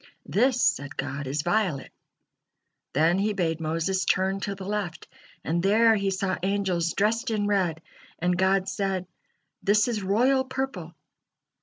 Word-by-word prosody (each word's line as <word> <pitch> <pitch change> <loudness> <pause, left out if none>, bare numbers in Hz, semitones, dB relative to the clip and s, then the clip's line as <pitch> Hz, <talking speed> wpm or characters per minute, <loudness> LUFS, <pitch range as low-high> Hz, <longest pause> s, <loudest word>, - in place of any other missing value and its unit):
"This," 250 +4 +2
said 145 - 0
God, 140 0 -4
"is 145 +3 -2
violet." 175 -6 0 1.0
Then 165 +6 +3
He 210 +2 +1
bade 165 -4 -1
Moses 165 +4 0
turn 190 +1 +1
to 200 0 -3
the 190 -1 -8
left, 195 -5 -4 0.4
and 170 +2 0
there 220 +4 +5
he 200 -1 0
saw 190 0 -1
angels 185 -3 0
dressed 225 +4 +1
in 215 -2 0
red, 180 -6 0 0.3
and 180 +1 +1
God 190 +1 +2
said: 195 -2 -2 0.6
"This 210 +2 +3
is 225 -4 -1
royal 245 +8 +2
purple." 260 -11 -5
195 Hz, 145 wpm, -26 LUFS, 170-210 Hz, 1.0 s, there